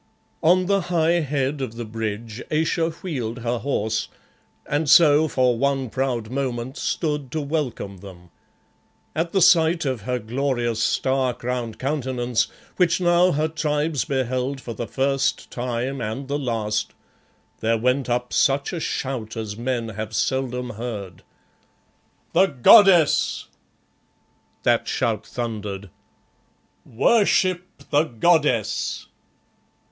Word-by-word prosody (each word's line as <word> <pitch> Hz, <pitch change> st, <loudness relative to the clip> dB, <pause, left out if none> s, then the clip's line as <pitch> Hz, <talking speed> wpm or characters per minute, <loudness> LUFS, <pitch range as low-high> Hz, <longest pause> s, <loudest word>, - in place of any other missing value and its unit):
On 180 Hz, +3 st, +4 dB
the 200 Hz, +1 st, +2 dB
high 170 Hz, 0 st, +2 dB
head 140 Hz, -2 st, -1 dB
of 115 Hz, -4 st, -4 dB
the 120 Hz, 0 st, -5 dB
bridge 110 Hz, +1 st, -5 dB
Ayesha 165 Hz, +1 st, +1 dB
wheeled 130 Hz, -9 st, -5 dB
her 120 Hz, 0 st, -1 dB
horse, 110 Hz, -5 st, -1 dB, 0.6 s
and 145 Hz, +1 st, -1 dB
so 155 Hz, -1 st, +6 dB
for 125 Hz, -4 st, +1 dB
one 135 Hz, -3 st, 0 dB
proud 125 Hz, -4 st, -2 dB
moment 130 Hz, -1 st, -3 dB
stood 150 Hz, -6 st, -2 dB
to 160 Hz, -, -1 dB
welcome 140 Hz, -9 st, -3 dB
them. 90 Hz, -2 st, -13 dB, 0.8 s
At 165 Hz, +2 st, -1 dB
the 190 Hz, -3 st, +3 dB
sight 165 Hz, -1 st, +4 dB
of 130 Hz, -5 st, -2 dB
her 125 Hz, +4 st, -2 dB
glorious, 120 Hz, -1 st, -1 dB
star 130 Hz, +1 st, +1 dB
crowned 120 Hz, -2 st, -4 dB
countenance, 130 Hz, -4 st, -1 dB, 0.3 s
which 180 Hz, -2 st, +3 dB
now 175 Hz, 0 st, +4 dB
her 155 Hz, +2 st, +1 dB
Tribes 150 Hz, -2 st, -1 dB
beheld 130 Hz, 0 st, -2 dB
for 120 Hz, -2 st, -7 dB
the 115 Hz, +1 st, -5 dB
first 135 Hz, 0 st, -1 dB
time 125 Hz, +2 st, -3 dB
and 115 Hz, +5 st, -4 dB
the 145 Hz, +1 st, -2 dB
last, 110 Hz, -5 st, -2 dB, 0.7 s
there 115 Hz, +1 st, +1 dB
went 125 Hz, +3 st, 0 dB
up 125 Hz, +1 st, -1 dB
such 140 Hz, +5 st, +2 dB
a 175 Hz, -, -2 dB
shout 125 Hz, -8 st, -3 dB
as 110 Hz, -2 st, -4 dB
men 120 Hz, 0 st, -2 dB
have 110 Hz, +1 st, -6 dB
seldom 125 Hz, -2 st, -1 dB
heard. 105 Hz, -6 st, -6 dB, 1.1 s
"The 190 Hz, +3 st, +5 dB
Goddess!" 175 Hz, -, +5 dB, 1.1 s
that -, -, +2 dB
shout -, -, -1 dB
thundered. 105 Hz, -5 st, -5 dB, 1.0 s
"Worship 185 Hz, -, +3 dB, 0.3 s
the 145 Hz, +2 st, +4 dB
Goddess!" 120 Hz, -, +1 dB
130 Hz, 120 wpm, -23 LUFS, 115-150 Hz, 1.1 s, so